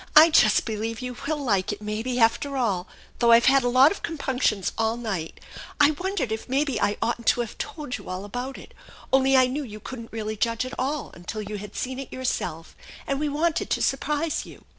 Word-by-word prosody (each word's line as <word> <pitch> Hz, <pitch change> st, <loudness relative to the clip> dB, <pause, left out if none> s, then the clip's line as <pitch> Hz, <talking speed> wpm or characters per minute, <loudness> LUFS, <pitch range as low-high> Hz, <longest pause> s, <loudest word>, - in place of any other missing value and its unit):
" -, -, -26 dB
I 330 Hz, -, 0 dB
just 215 Hz, -9 st, +5 dB
believe 225 Hz, +1 st, -3 dB
you 250 Hz, -1 st, -5 dB
will 310 Hz, 0 st, 0 dB
like 210 Hz, -10 st, 0 dB
it, 205 Hz, -, -5 dB
maybe, 220 Hz, +4 st, -3 dB
after 235 Hz, +5 st, +2 dB
all, 205 Hz, -7 st, 0 dB, 0.3 s
though 235 Hz, -1 st, +5 dB
I've 230 Hz, +1 st, +7 dB
had 270 Hz, 0 st, +5 dB
a 245 Hz, -, +2 dB
lot 260 Hz, +5 st, +6 dB
of 405 Hz, -, -5 dB
compunctions 260 Hz, -, -1 dB
all 225 Hz, +1 st, 0 dB
night. 195 Hz, -9 st, -4 dB, 0.4 s
I 295 Hz, 0 st, +6 dB
wondered 350 Hz, -, -2 dB
if 220 Hz, +3 st, -4 dB
maybe 275 Hz, +1 st, 0 dB
I 205 Hz, -, +1 dB
oughtn't 235 Hz, 0 st, -2 dB
to 245 Hz, -, +4 dB
have 235 Hz, -, -5 dB
told 295 Hz, -6 st, -5 dB
you -, -, -11 dB
all 185 Hz, +2 st, -4 dB
about 245 Hz, +6 st, -5 dB
it; -, -, -13 dB, 0.4 s
only 265 Hz, 0 st, +5 dB
I 260 Hz, -, +6 dB
knew 260 Hz, +4 st, -2 dB
you 215 Hz, -4 st, -9 dB
couldn't 230 Hz, 0 st, -8 dB
really 215 Hz, -1 st, -4 dB
judge 230 Hz, +3 st, 0 dB
at 255 Hz, -, -7 dB
all 285 Hz, +3 st, -2 dB
until 195 Hz, +5 st, -6 dB
you 210 Hz, 0 st, -5 dB
had 205 Hz, 0 st, -9 dB
seen 260 Hz, +1 st, -3 dB
it 275 Hz, -, -7 dB
yourself, 175 Hz, -10 st, -3 dB, 0.3 s
and 275 Hz, 0 st, -1 dB
we 300 Hz, 0 st, 0 dB
wanted 315 Hz, +3 st, 0 dB
to -, -, 0 dB
surprise 295 Hz, +3 st, 0 dB
you." -, -, -14 dB
245 Hz, 220 wpm, -25 LUFS, 215-275 Hz, 0.4 s, I've